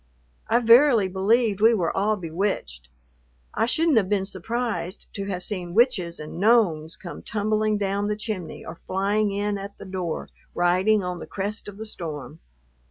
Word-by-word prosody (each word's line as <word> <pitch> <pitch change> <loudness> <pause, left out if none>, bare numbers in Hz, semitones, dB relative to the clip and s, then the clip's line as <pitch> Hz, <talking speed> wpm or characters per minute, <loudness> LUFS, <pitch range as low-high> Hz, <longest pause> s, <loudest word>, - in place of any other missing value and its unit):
I 230 - +3
verily 235 -2 +6
believe 205 +3 +1
we 225 +1 +6
were 175 -5 -1
all 210 +2 +2
bewitched. 165 - -3 0.6
I 225 +2 +1
shouldn't 315 +1 +3
have 195 -4 +2
been 200 -2 +1
surprised 200 -1 -3
to 200 - -4
have 185 -2 -3
seen 180 -3 -4
witches 195 -8 +2
and 155 +2 -7
gnomes 190 -8 +3
come 175 - -9
tumbling 215 0 0
down 200 0 -1
the 210 - 0
chimney 210 -6 -5
or 165 - -8
flying 200 +2 +1
in 205 0 -1
at 200 +1 -8
the - - -10
door, 185 -3 -4 0.3
riding 185 +4 +3
on 180 -1 -4
the - - -8
crest 205 +3 -4
of 200 -1 -9
the 220 - -6
storm. 150 - -6
200 Hz, 165 wpm, -24 LUFS, 180-215 Hz, 0.6 s, verily